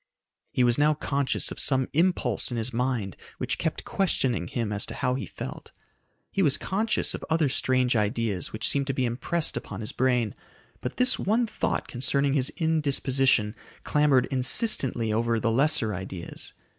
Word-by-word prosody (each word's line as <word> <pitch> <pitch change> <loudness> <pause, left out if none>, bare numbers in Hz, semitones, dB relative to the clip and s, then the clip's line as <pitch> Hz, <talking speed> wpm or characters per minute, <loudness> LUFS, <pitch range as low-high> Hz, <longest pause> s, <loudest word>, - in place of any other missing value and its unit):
He 125 - +1
was 120 +2 +3
now 150 +1 +4
conscious 140 -2 0
of - - -6
some 130 -2 +3
impulse 160 - +1
in 120 - -3
his 115 +2 -1
mind 120 -6 -1 0.2
which - - -2
kept - - -3
questioning 130 - 0
him 110 0 -3
as 100 - 0
to - - -7
how 125 -2 0
he 130 - -4
felt. - - -8 0.6
He 195 - 0
was 145 -5 +4
conscious 215 +3 0
of - - -6
other 160 -3 +2
strange 130 -1 +1
ideas 105 -2 -1
which 110 - -1
seemed 140 -1 +2
to 135 - -1
be 130 - 0
impressed 135 +8 -1
upon 105 - -6
his 110 - -4
brain, 125 -4 +1 0.5
but 125 - -5
this 250 +1 +3
one 225 +5 +1
thought 215 - -2
concerning 140 +2 0
his 135 -2 0
indisposition 135 -8 +2 0.3
clamored 145 -4 +3
insistently 130 - +1
over 115 +1 +1
the 115 0 0
lesser 130 -3 +2
ideas. 95 -2 -7
130 Hz, 170 wpm, -26 LUFS, 115-150 Hz, 0.6 s, now